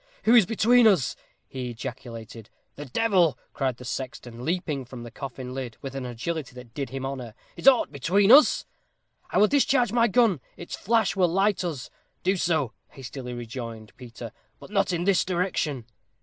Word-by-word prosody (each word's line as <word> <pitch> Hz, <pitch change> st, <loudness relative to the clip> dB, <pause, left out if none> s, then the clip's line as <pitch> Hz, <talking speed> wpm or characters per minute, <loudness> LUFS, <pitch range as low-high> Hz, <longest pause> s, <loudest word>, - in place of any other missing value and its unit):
"Who 225 Hz, -, +4 dB
is 225 Hz, -7 st, +7 dB
between 235 Hz, +2 st, +5 dB
us?" 180 Hz, -, +3 dB, 0.3 s
he 130 Hz, -2 st, -5 dB
ejaculated. 115 Hz, -2 st, -8 dB, 0.3 s
"The 145 Hz, -, -7 dB
devil!" 180 Hz, -, +2 dB, 0.2 s
cried 130 Hz, -3 st, -1 dB
the 125 Hz, -, -11 dB
sexton, 120 Hz, -1 st, -6 dB
leaping 160 Hz, -4 st, -2 dB
from 120 Hz, -1 st, -9 dB
the 120 Hz, -, -9 dB
coffin 130 Hz, -2 st, -7 dB
lid 130 Hz, -4 st, -6 dB
with 135 Hz, -1 st, -5 dB
an 130 Hz, -2 st, -4 dB
agility 130 Hz, +3 st, -4 dB
that 125 Hz, -2 st, -12 dB
did 140 Hz, -3 st, -4 dB
him 135 Hz, +1 st, -5 dB
honor. 125 Hz, -5 st, -6 dB, 0.2 s
"Is -, -, -4 dB
aught 260 Hz, -3 st, +6 dB
between 190 Hz, -, +3 dB
us?" 290 Hz, +4 st, +7 dB, 0.6 s
"I -, -, -1 dB
will 210 Hz, -, +6 dB
discharge 270 Hz, -4 st, +2 dB
my 235 Hz, 0 st, +4 dB
gun. 205 Hz, -, +3 dB, 0.2 s
Its 170 Hz, -, -6 dB
flash 225 Hz, -1 st, +1 dB
will 185 Hz, -2 st, +3 dB
light 195 Hz, +3 st, +1 dB
us." 155 Hz, -8 st, -5 dB, 0.3 s
"Do 190 Hz, +2 st, +2 dB
so," 160 Hz, -, 0 dB
hastily 125 Hz, -2 st, -8 dB
rejoined 115 Hz, -2 st, -7 dB
Peter. 120 Hz, -2 st, -9 dB, 0.3 s
"But -, -, -13 dB
not 195 Hz, -2 st, +1 dB
in 175 Hz, -1 st, -1 dB
this 195 Hz, 0 st, +3 dB
direction." 170 Hz, -8 st, -1 dB
140 Hz, 175 wpm, -26 LUFS, 125-195 Hz, 0.6 s, is